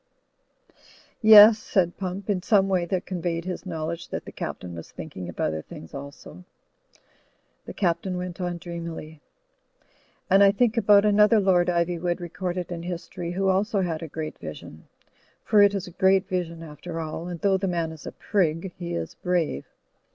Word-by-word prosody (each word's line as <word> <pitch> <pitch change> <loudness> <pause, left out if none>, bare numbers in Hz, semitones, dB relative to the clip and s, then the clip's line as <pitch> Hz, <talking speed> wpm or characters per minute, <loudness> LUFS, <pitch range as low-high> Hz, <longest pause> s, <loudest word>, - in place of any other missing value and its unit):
'*Yes," 215 0 +9
said 175 -5 0
Pump, 190 +1 -5
in 200 -4 0
some 195 0 +3
way 185 -3 +1
that 185 +1 -2
conveyed 175 -2 -3
his 185 +1 -5
knowledge 165 0 -4
that - - -5
the - - -9
Captain 90 -1 -6
was 85 -1 -9
thinking 95 - -8
of 90 - -11
other 80 0 -1
things 80 - -12
also. 140 -10 -10 1.2
The - - -9
Captain 180 0 -1
went 180 0 -5
on 175 -1 -2
dreamily: 170 -3 -7 1.1
"And 195 +1 +5
I 200 0 +6
think 230 +1 +2
about 210 -3 +5
another 210 +1 +5
Lord 185 -3 +3
Ivjnvood 175 0 0
recorded 180 +1 -4
in 170 -1 -4
history 175 0 -5
who 195 +1 0
also 200 +2 +1
had 165 -4 -2
a 165 - -5
great 155 +1 -6
vision. 80 0 -10 0.6
For 210 -2 +4
it 205 0 +5
is 195 -2 -3
a 180 - -10
great 190 +2 +3
vision 170 -3 -3
after 165 +2 -7
all, 160 +1 -5
and 175 -1 -6
though 195 +1 +2
the 195 +1 -2
man 170 -3 -1
is 160 -3 -10
a - - -5
prig, 180 -2 -1
he 85 0 -4
is 85 -1 -4
brave. 170 - -1
175 Hz, 175 wpm, -25 LUFS, 165-195 Hz, 1.2 s, Yes